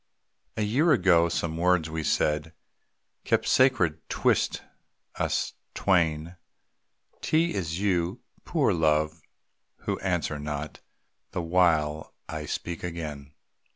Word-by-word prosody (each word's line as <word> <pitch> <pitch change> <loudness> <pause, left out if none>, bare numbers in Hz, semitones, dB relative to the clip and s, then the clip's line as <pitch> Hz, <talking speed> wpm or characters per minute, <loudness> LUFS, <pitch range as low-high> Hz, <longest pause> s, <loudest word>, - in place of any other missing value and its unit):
A 110 - +1
year 135 +11 +3
ago 85 -8 +4
some 80 -1 -2
words 90 -1 +2
we 80 0 -4
said 75 +1 0 0.7
Kept - - +1
sacred 90 - +3
'twixt - - +1 0.5
us - - -1 0.2
twain, 85 -2 +1 0.8
'T 165 +2 +2
is 85 -2 -3
you, 90 -3 0 0.2
poor - - +1
Love, 80 0 +1 0.6
who - - -1
answer 75 - -1
not, 75 0 -5 0.5
The 90 - -2
while 80 -3 +1
I 75 -1 -5
speak 85 +3 -4
again. 75 -4 -6
85 Hz, 110 wpm, -27 LUFS, 75-90 Hz, 0.8 s, ago